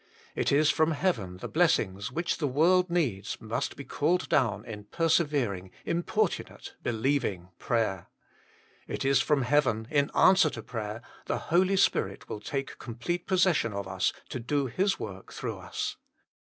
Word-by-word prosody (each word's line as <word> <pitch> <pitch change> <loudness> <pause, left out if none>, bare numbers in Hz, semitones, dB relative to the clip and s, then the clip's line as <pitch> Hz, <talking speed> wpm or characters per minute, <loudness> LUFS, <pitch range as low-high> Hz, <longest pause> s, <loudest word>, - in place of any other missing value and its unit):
It - - +1
is 145 +2 +4
from 160 +1 +2
heaven 110 - -1
the - - -6
blessings, 120 - +1
which 170 +5 -1
the 150 - +1
world 175 +7 +3
needs, 120 - -1
must 115 +1 -3
be 140 - -7
called 170 +6 0
down 125 -7 +1
in 105 -2 -8
persevering, 145 - +1 0.2
importunate, 175 +4 -1
believing 115 -7 -1
prayer. 110 -6 -1 0.8
It - - -3
is 135 -1 +4
from 145 -3 +2
heaven, 120 -5 +2
in 145 -1 +2
answer 190 -4 +6
to 110 -6 -7
prayer, 110 0 -5 0.2
the - - 0 0.2
Holy 190 +2 +4
Spirit 195 - +1
will 105 - -5
take 135 +5 -4
complete 125 +10 -4
possession 180 - +2
of 100 -1 -4
us 95 -1 0 0.2
to 130 - -4
do 140 +4 0
His 190 - 0
work 95 -2 -7
through - - -5
us. - - -4
135 Hz, 155 wpm, -29 LUFS, 110-170 Hz, 0.8 s, answer